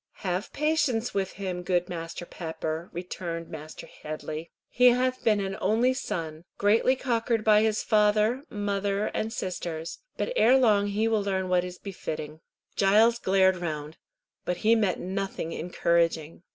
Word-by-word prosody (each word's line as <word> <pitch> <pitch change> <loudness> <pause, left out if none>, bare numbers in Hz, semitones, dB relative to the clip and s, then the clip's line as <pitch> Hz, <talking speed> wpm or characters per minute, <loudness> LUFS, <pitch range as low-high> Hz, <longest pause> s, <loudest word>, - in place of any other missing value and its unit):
"Have 185 +3 -2
patience 295 -6 0
with 195 -1 -1
him, 185 -2 -4
good 180 0 0
Master 165 0 -6
Pepper," 160 0 -5
returned 170 -1 -5
Mr. 155 +1 -8
Headley. 155 +1 -7 0.2
"He 250 +1 +4
hath 255 +1 +2
been 215 -2 +3
an 195 -1 -2
only 225 +6 +3
son, 160 - -4
greatly 220 +6 +3
cockered 230 -3 0
by 215 0 +5
father, 215 +3 +2
mother, 200 0 -1
and 220 - -2
sisters, 170 -6 -4 0.2
but - - -2
ere 255 - +6
long 210 -5 +4
he 210 +2 0
will 220 -2 +2
learn 190 -2 -1
what 180 -1 +3
is 180 0 -7
befiting." 155 -5 -6 0.4
Giles 220 +4 +4
glared 190 -2 +3
round, 155 -3 -4 0.5
but 180 - -2
he 225 - +6
met 210 -6 +1
nothing 190 -2 -3
encouraging. 170 -2 0
195 Hz, 145 wpm, -27 LUFS, 170-220 Hz, 0.5 s, ere